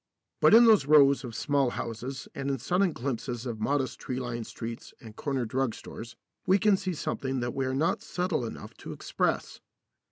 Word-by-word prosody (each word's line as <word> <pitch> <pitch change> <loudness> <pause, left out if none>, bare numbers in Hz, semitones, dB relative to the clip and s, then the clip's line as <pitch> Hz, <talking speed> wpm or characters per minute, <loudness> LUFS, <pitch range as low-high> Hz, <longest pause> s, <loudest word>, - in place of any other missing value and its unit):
But - - +7
in 235 +1 +9
those 215 -11 +5
rows 140 -2 +6
of 120 -3 -7
small 140 -3 +1
houses 120 +4 -5
and 140 0 -3
in 135 - 0
sudden 180 - +1
glimpses 125 -2 -4
of 115 -3 -4
modest 135 +3 -1
tree 130 0 -4
lined 120 -3 -4
streets 115 0 -7
and 110 -2 -12
corner 135 -2 -2
drug 125 +1 -1
stores 115 +1 -9 0.3
we 190 - +5
can 205 0 +4
see 190 -2 -3
something 135 -2 -2
that 120 0 -2
we 135 -1 -1
are 130 - -1
not 155 +5 +1
subtle 180 -6 -2
enough 115 - -7
to - - -8
express. - - -2
135 Hz, 190 wpm, -28 LUFS, 120-150 Hz, 0.3 s, in